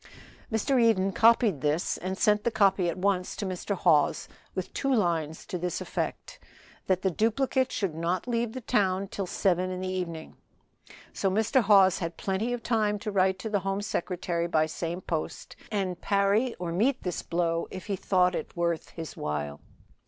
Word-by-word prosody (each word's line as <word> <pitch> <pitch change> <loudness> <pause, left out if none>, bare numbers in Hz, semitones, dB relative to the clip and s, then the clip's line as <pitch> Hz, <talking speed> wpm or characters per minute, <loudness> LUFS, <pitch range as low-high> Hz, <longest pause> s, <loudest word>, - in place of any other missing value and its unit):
Mr. 240 +4 +2
Eden 195 -4 +3
copied 220 - +4
this, 150 +4 0
and 190 +1 -4
sent 210 0 +3
the - - +2
copy 195 -5 +3
at 170 - -4
once 185 -1 0
to 205 - -4
Mr. 190 +2 -3
Hawes 160 -6 +2 0.3
with 185 -2 -4
two 275 - -1
lines 165 - 0
to 180 - -4
this 180 0 -2
effect, - - -4 0.5
that 185 -1 +1
the 190 - +2
duplicate 255 - +1
should 195 -6 -1
not 170 +5 -2
leave 235 -2 -1
the 255 - -5
town 195 -3 +1
till 195 -2 -4
seven 185 0 +1
in 185 0 -4
the 185 - -3
evening, 175 -4 -4 0.8
so 195 - 0
Mr. 220 +7 +2
Hawes 195 -3 +5
had 170 -1 -4
plenty 195 +5 -1
of 245 -2 -3
time 215 -3 +1
to 210 +1 -4
write 190 -1 +2
to 205 +4 -5
the 205 - +2
Home 195 +1 -2
Secretary 175 -4 -2
by 155 -2 +2
same 165 +3 -4
post, 160 -3 -4 0.2
and 190 -4 -2
parry 200 +5 +2
or 175 -2 -4
meet 240 +10 +1
this 180 -2 -2
blow 170 -1 -1
if 185 - -8
he 200 - -1
thought 180 -1 +2
it - - -5
worth 170 -1 -1
his 165 -2 -8
while. 75 -1 -3
190 Hz, 180 wpm, -28 LUFS, 175-210 Hz, 0.8 s, Hawes